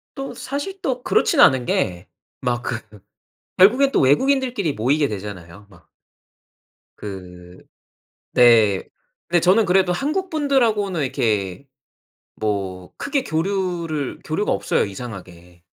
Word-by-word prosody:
또 270 -1 -6
사실 290 +9 -6
또 250 -2 -2
그렇진 385 -8 +2
않은 130 - +6
게 90 -4 -1 0.4
막 120 -1 -1
그 115 - -2 0.8
결국엔 250 +9 +5
또 - - +2
외국인들끼리 225 - +2
모이게 140 +6 +1
되잖아요 100 -2 -8
막. 90 -5 -21 1.1
그 90 -3 -10 0.8
네. 115 -5 +5 0.5
근데 175 0 +3
저는 190 +6 +4
그래도 185 -1 +3
한국분들하고는 270 - 0
이렇게 115 -4 -1 0.7
뭐 95 -4 -3
크게 280 -1 -1
교류를 170 - -2
교류가 180 +7 -1
없어요 - - 0
이상하게. 90 -5 -10
140 Hz, 245 characters per minute, -21 LUFS, -, 1.1 s, 않은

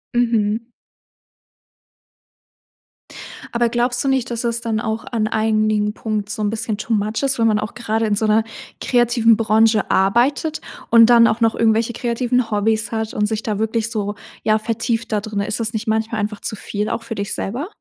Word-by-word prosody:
Mhm. 230 -2 +1 2.9
Aber 235 0 +2
glaubst 245 +1 0
du 275 - -1
nicht, 265 -2 0
dass 235 0 -3
es 235 0 -1
dann 225 -2 -1
auch 220 0 -3
an 220 -3 0
einigen 215 -1 +1
Punkt 210 -2 -3
so 215 - -4
'n 205 - +1
bisschen 220 0 -3
too 220 +2 -3
much 215 +4 -1
ist, 270 -2 +1
wenn 225 - +4
man 210 -1 +2
auch 215 - -5
grade 225 -1 -1
in 210 -1 +1
so 215 +2 0
'ner 215 +1 +3 0.4
kreativen 240 -2 +3
Branche 220 0 +3
arbeitet 250 +11 +2 0.3
und 230 0 +7
dann 235 -1 +7
auch 225 +2 -1
noch 225 0 +3
irgendwelche 225 +1 +2
kreativen 240 0 -1
Hobbys 220 +2 0
hat 220 -1 -3
und 210 - +1
sich 220 0 -3
da 210 -2 -2
wirklich 220 0 -1
so, 205 -1 -2 0.3
ja, 215 0 +2
vertieft 230 +1 -2
da 210 -1 0
drinnen? 210 -1 -3
Ist 215 - -2
das 225 0 -2
nicht 220 +1 -4
manchmal 220 0 0
einfach 210 0 -3
zu - - -3
viel 210 +1 -4
auch 230 - -3
für 225 - -6
dich 200 -1 -3
selber? 250 - -3
220 Hz, 190 wpm, -20 LUFS, 215-235 Hz, 2.9 s, und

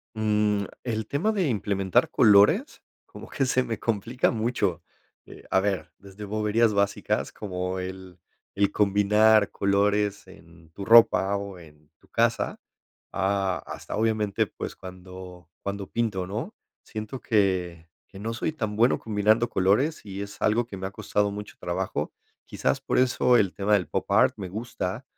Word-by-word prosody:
Mm, 105 -1 +1 0.2
el 110 -3 -3
tema 170 +10 0
de 190 -7 0
implementar 100 -5 +1
colores, 110 - +4 0.2
como - - -12
que 135 - 0
se 130 0 +2
me 115 -3 -4
complica 115 +3 0
mucho, 110 -7 -1 0.4
eh, - - -13
a 95 - +3
ver, 100 -2 -2
desde 100 +1 -10
boberías 110 +2 +1
básicas, 100 0 0
como 90 -2 -4
el 95 -1 -8 0.3
el 100 0 +2
combinar 105 +1 +4
colores 100 +1 0
en 85 -1 -17
tu 100 - -8
ropa 100 -3 +5
o 100 -2 -7
en 75 -3 -17
tu - - -26
casa, - - 0 0.5
a 95 -1 0
hasta - - -7
obviamente, 110 -2 +1
pues - - -7
cuando 90 -2 -11
cuando 100 -1 -4
pinto, 105 -6 -1
¿no? 115 - -5 0.3
siento 110 +4 -6
que 90 -6 0 0.2
que 95 - -13
no 115 +2 -3
soy 120 - -2
tan 110 -9 -4
bueno 120 +4 +3
combinando 110 +2 +2
colores 105 - +1
y 100 0 -6
es 100 - -9
algo 115 +2 +2
que 100 - -8
me 95 0 -4
ha - - -5
costado 105 +1 -1
mucho 105 0 -8
trabajo, - - -3 0.3
quizás - - -1
por - - -1
eso 125 -1 +3
el 100 -5 +2
tema 105 +1 -1
del 90 -6 +2
popart - - +2
me 95 -3 -6
gusta, 110 +2 -5
100 Hz, 155 wpm, -26 LUFS, 95-110 Hz, 0.5 s, ropa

